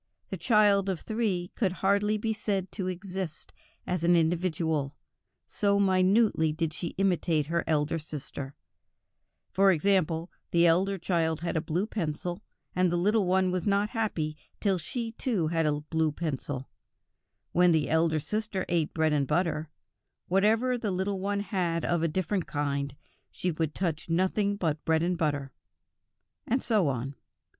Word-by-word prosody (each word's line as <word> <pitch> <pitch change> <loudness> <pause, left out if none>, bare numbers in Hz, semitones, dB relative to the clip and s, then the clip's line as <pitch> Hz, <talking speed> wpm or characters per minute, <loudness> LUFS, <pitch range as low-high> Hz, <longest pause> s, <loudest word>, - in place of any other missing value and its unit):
The 190 - -2
child 200 0 +4
of 185 -4 -2
three 210 -6 -1
could 195 -6 0
hardly 200 +3 +2
be 220 +1 -1
said 200 -3 -2
to 190 - -4
exist 185 -2 -5 0.3
as 180 -2 -2
an 175 +1 +5
individual, 160 -3 0 0.5
so 200 -2 +1
minutely 190 -3 +3
did 160 0 -2
she 170 0 -5
imitate 175 -5 +1
her 170 +2 0
elder 155 +1 +1
sister; 145 -2 -7 1.0
for 195 0 +5
example, 175 -2 +1 0.2
the 170 0 +4
elder 190 +4 +3
child 165 -3 0
had 170 0 -2
a 160 - +1
blue 170 +4 -1
pencil 175 -4 -3 0.3
and 180 -1 +3
the 175 - +1
little 205 +2 +2
one 185 0 +3
was 185 +2 -2
not 205 +1 +2
happy 175 -10 -1 0.2
till 195 -3 +1
she 230 +8 -4
too 220 -9 -1
had 165 -1 +1
a 150 0 0
blue 160 0 0
pencil; 145 -4 -4 0.8
when 180 0 +5
the 160 -3 +2
elder 160 -1 +2
sister 210 +2 -3
ate 165 -3 0
bread 160 -2 +2
and 140 -2 +1
butter, 160 0 0 0.6
whatever 225 +7 +2
the 220 - -2
little 190 +1 -1
one 200 +1 -1
had 175 -5 -1
of 170 -2 +1
a 165 - +2
different 185 +3 -1
kind, 140 -2 -2 0.3
she 180 - -2
would 155 -1 -2
touch 165 -3 -2
nothing 190 +4 +1
but 160 -6 -1
bread 160 0 +2
and 175 0 0
butter, 145 -4 -1 1.0
and 255 +3 +1
so 210 -8 +2
on. 135 0 -2
175 Hz, 155 wpm, -28 LUFS, 160-195 Hz, 1.0 s, an